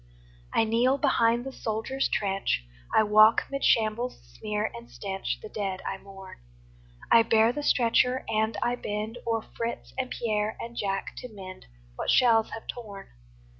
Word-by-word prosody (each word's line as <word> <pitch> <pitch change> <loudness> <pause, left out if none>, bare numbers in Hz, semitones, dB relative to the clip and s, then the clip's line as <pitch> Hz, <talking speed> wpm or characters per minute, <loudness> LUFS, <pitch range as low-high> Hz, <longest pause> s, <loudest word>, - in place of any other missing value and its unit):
I - - +3
kneel 235 +5 +2
behind 240 -4 +2
the 270 - -5
soldier's 235 +3 -2
trench, 195 - 0 0.3
I - - +5
walk 215 +1 +6
'mid 275 0 -3
shambles' 225 - +2
smear 210 - -2
and 115 0 -10
stench, 190 +11 -4
The - - -6
dead 195 -3 -4
I 195 - -3
mourn; 195 -1 -12 0.7
I 230 - +8
bear 225 +1 +4
the 295 - -3
stretcher 250 -1 +2
and 220 0 0
I 240 - +1
bend 215 +3 -4
O'er 225 -1 0
Fritz 235 0 -4
and 255 -1 -1
Pierre 215 -2 -1
and 235 0 -7
Jack 195 -3 -2
to 250 - -7
mend 190 - -10 0.3
What - - -3
shells 230 -3 +4
have 225 - -8
torn. 210 -5 -8
220 Hz, 160 wpm, -27 LUFS, 205-235 Hz, 0.7 s, I